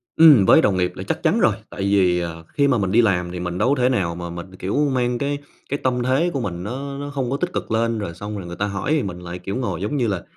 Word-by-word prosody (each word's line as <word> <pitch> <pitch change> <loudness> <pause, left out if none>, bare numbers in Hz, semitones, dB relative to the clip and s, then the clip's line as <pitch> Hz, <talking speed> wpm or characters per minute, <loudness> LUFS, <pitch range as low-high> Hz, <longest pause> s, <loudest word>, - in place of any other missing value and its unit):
Ừm, 150 -11 +8
với - - +7
đồng 95 -3 +2
nghiệp 90 -1 +1
là - - -6
chắc - - -3
chắn - - +3
rồi, - - +3
tại - - -7
vì, 95 -3 +3
à, 85 -1 -6
khi 140 -1 +3
mà 130 - +3
mình 95 -3 -1
đi 115 +4 +5
làm 90 -5 +1
thì 90 - -5
mình 90 0 -3
đâu 125 - +2
có 130 - -2
thể 125 - +4
nào 90 -9 0
mà 85 0 -6
mình, 85 +2 -8
kiểu, 95 +2 -3 0.2
mang 125 -1 0
cái 140 +2 -1 0.3
cái 140 - -1
tâm 125 -1 +1
thế 135 +8 +2
của 140 - -1
mình 90 -5 -4
nó 140 +6 -5
nó 145 +1 -5
không 135 -4 -2
có 140 - 0
tích 180 +2 -3
cực - - -4
lên, 115 0 +1
rồi 95 -5 -4
xong 105 +4 -6
rồi 90 - -7
người 85 - -6
ta 100 - -1
hỏi 100 +7 -3
thì 155 -3 +2
mình 90 -3 -5
lại 90 0 -7
kiểu 95 +3 -5
ngồi 100 -9 -2
giống 110 +9 -1
như 120 -4 +1
là 95 -4 -2
105 Hz, 305 wpm, -22 LUFS, 90-130 Hz, 0.3 s, Ừm